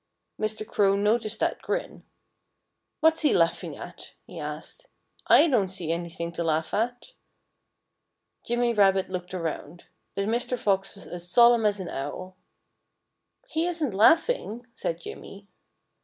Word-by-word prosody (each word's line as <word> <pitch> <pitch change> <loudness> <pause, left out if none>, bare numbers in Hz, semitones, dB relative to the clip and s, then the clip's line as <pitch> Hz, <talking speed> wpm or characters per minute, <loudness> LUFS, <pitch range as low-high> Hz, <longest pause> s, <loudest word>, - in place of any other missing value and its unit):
Mr. 215 0 -2
Crow 195 -3 +3
noticed 215 +2 +1
that - - 0
grin. - - -4 1.0
"What's 320 +1 +4
he 300 - +3
laughing 165 -1 +1
at?" - - -10
he - - -10
asked. - - -7 0.4
"I - - +7
don't 230 -10 +2
see 180 -3 -4
anything 170 0 -4
to 170 - -3
laugh 160 -1 0
at." 245 - -2 1.3
Jimmy 240 0 +1
Rabbit 195 -3 +3
looked 180 0 -5
around. 165 -1 -5 0.3
But 200 - -1
Mr. 240 +3 0
Fox 195 -5 0
was 200 - -12
as 175 0 -6
solemn 235 +2 +6
as 205 -1 0
an 185 - -5
owl. 185 +7 -6 1.1
"He 330 -6 -1
isn't 320 - -2
laughing," 245 - +3
said 165 - -3
Jimmy. 200 +3 -10
200 Hz, 135 wpm, -26 LUFS, 180-240 Hz, 1.3 s, I